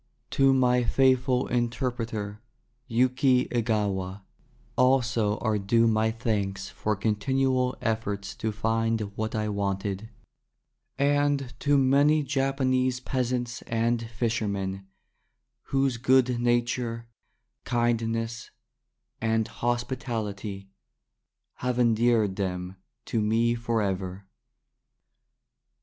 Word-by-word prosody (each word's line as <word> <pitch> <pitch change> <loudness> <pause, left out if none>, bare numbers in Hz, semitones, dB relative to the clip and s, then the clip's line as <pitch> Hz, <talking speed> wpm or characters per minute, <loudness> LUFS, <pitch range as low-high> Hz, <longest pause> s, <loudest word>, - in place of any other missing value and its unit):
To 135 -1 +4
my 125 -2 +3
faithful 130 0 +3
interpreter 115 -3 -2 0.5
Yuki 125 +2 +3
Egawa 105 -5 -1 0.5
also 120 -5 +2
are 110 -2 0
due 115 +4 +3
my 110 -1 +2
thanks 100 -4 -2
for 105 0 -2
continual 125 +5 0
efforts 100 -3 -2
to 110 - -2
find 115 +1 0
what 110 0 -3
I 110 -1 -1
wanted; 100 0 -2 0.9
and 145 -2 +1
to 145 0 +3
many 140 +3 +4
Japanese 130 -2 +1
peasants 125 -2 -2
and 115 +1 +1
fishermen, 105 -5 -2 0.8
whose 135 -2 +1
good 125 0 +3
nature, 120 -1 0 0.6
kindness, 115 -1 -1 0.7
and 110 -1 +1
hospitality 115 -5 -3 0.9
have 125 -1 -2
endeared 115 -4 +3
them 90 -1 -3 0.3
to 115 - -1
me 115 +2 +2
for 115 -2 -1
ever. 95 0 -3
115 Hz, 90 wpm, -27 LUFS, 105-125 Hz, 0.9 s, To